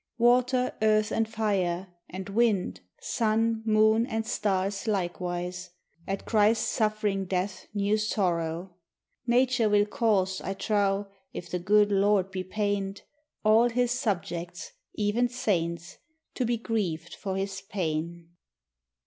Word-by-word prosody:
Water, 250 +2 +3
earth, 215 0 +3
and 225 -1 0
fire, 190 -4 -1 0.2
and 190 +1 -6
wind, 210 -3 +1 0.2
sun, 225 - +1
moon, 220 +2 +4
and 225 -3 -2
stars 195 -2 -1
likewise, 180 -2 -2 0.4
At 195 0 -3
Christ's 215 0 +3
suffering 210 -3 0
death 185 +1 -3
knew 205 +1 +2
sorrow. 175 -4 -1 0.5
Nature 245 -2 +3
will 205 0 +4
cause, 200 -4 +1
I 195 - -4
trow, 200 -1 +1 0.3
if 175 - -7
the 180 - -1
good 205 +3 +4
Lord 200 -1 +2
be 185 -1 -3
pained, 200 0 -2 0.4
All 225 +3 +5
his 245 0 +1
subjects, 175 -6 -3 0.2
even 220 +4 +1
saints, 175 -8 -2 0.4
to 255 - -1
be 235 0 0
grieved 210 -8 -2
for 190 -1 -4
his 195 0 -3
pain. 170 -3 -3
205 Hz, 125 wpm, -28 LUFS, 185-220 Hz, 0.5 s, All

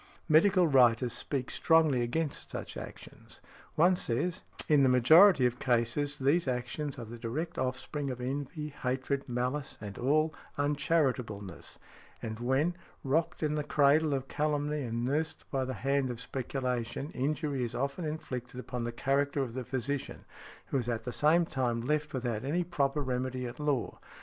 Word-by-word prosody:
Medical 180 +3 +5
writers 125 -3 +4
speak 130 +1 -2
strongly 160 -6 +3
against 145 +6 -2
such - - -6
actions. - - -10 0.4
One 175 +4 +5
says, 170 +6 -1 0.3
"In 150 -2 +5
the 135 - +5
majority 150 - +7
of 125 0 0
cases 130 +4 +1
these 140 +4 +2
actions 130 +3 -2
are 120 - -6
the 115 +2 -9
direct 155 +9 -4
offspring 130 +2 -2
of 125 -1 -4
envy, 145 +4 -4
hatred, 135 0 -2
malice 125 +4 -2
and 100 -2 -7
all 155 +5 +2 0.2
uncharitableness, 135 - -1 0.4
and 110 0 -5
when, 135 +8 +1 0.3
rocked 155 +4 0
in 150 -1 +1
the 150 -1 -1
cradle 145 +1 +3
of 135 0 -4
calumny 150 0 -1
and 120 -2 -2
nursed 155 +5 -1
by 135 -2 0
the 130 0 -4
hand 135 -1 0
of 120 -2 -5
speculation, 125 +1 -3
injury 145 0 -1
is 120 - -4
often 140 +6 -2
inflicted 130 -6 -5
upon 125 -2 -4
the 120 - -2
character 140 +3 0
of 120 -3 -5
the 130 0 -4
physician, 130 +2 -4 0.4
who 135 - +1
is 120 -1 -3
at 115 -2 -2
the 125 - -5
same 165 +3 +4
time 125 -5 -1
left 150 +5 -1
without 120 -5 -2
any 160 +6 0
proper 150 -4 0
remedy 130 0 -2
at 120 +3 -7
law. 145 -5 -1
135 Hz, 160 wpm, -31 LUFS, 125-150 Hz, 0.4 s, majority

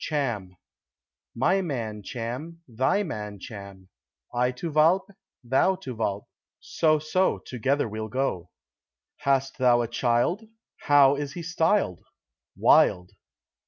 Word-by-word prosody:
"Cham." 115 - -3 0.8
"My 185 +11 +2
man 115 - -4
Cham, 130 - -6
thy 130 - +1
man 105 - -6
Cham; 100 -3 -10 0.4
I 125 +1 +1
to 160 +6 -5
Walpe, 165 +6 +3 0.3
thou 135 +10 +2
to 135 -9 -7
Walpe; 100 -2 -2 0.3
so, 155 -1 +1
so, 155 +5 +1
together 135 +3 -1
we'll 110 0 -5
go." 105 -9 -2 0.7
"Hast 135 0 0
thou 120 -2 +4
a - - -3
child; 120 - +1 0.4
how 140 -2 +5
is 145 -1 -4
he 170 - -6
styled?" 165 - +1 0.6
"Wild." 90 0 +4
130 Hz, 120 wpm, -26 LUFS, 110-155 Hz, 0.8 s, how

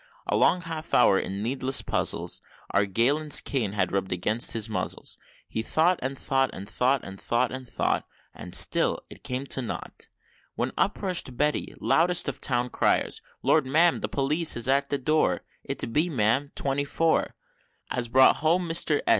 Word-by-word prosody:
A - - -1
long 180 - +3
half 160 -2 -4
hour, 95 - +5
in 100 +2 -4
needless 130 +2 +1
puzzle, - - 0 0.4
Our 100 0 +2
Galen's 140 +9 +2
cane 115 -8 -2
had 105 - 0
rubbed 95 -1 -2
against 105 +6 +1
his 115 -1 0
muzzle; 110 - -3 0.4
He 110 - -3
thought, 165 +9 +2
and 135 +1 -2
thought, 135 0 0
and 100 +1 -8
thought 130 +4 +1
and 95 0 -9
thought, 120 +1 0
and 130 -1 -7
thought - - -1 0.3
And - - -7
still - - +3
it - - -13
came 130 +2 -3
to 135 - -1
nought, 120 - -7 0.5
When - - -2
up - - -1
rush'd 175 -10 0
Betty, 150 +1 -1
loudest 175 +2 +2
of - - -4
Town 125 -1 0
Criers, - - 0 0.2
"Lord, 155 -4 +3
Ma'am, 165 +5 +4
the - - -3
new - - -23
Police 150 +3 +1
is 120 - +2
at 140 +1 +2
the 140 - 0
door! 155 +4 +1 0.2
It's - - -2
B, 155 +9 0
ma'am, 125 +1 +1
Twenty 140 0 -1
four, 165 +3 0 0.6
As 125 -1 -2
brought 130 +3 +5
home 170 +3 +1
Mister 165 -2 +2
S. - - -1
135 Hz, 180 wpm, -26 LUFS, 120-155 Hz, 0.6 s, hour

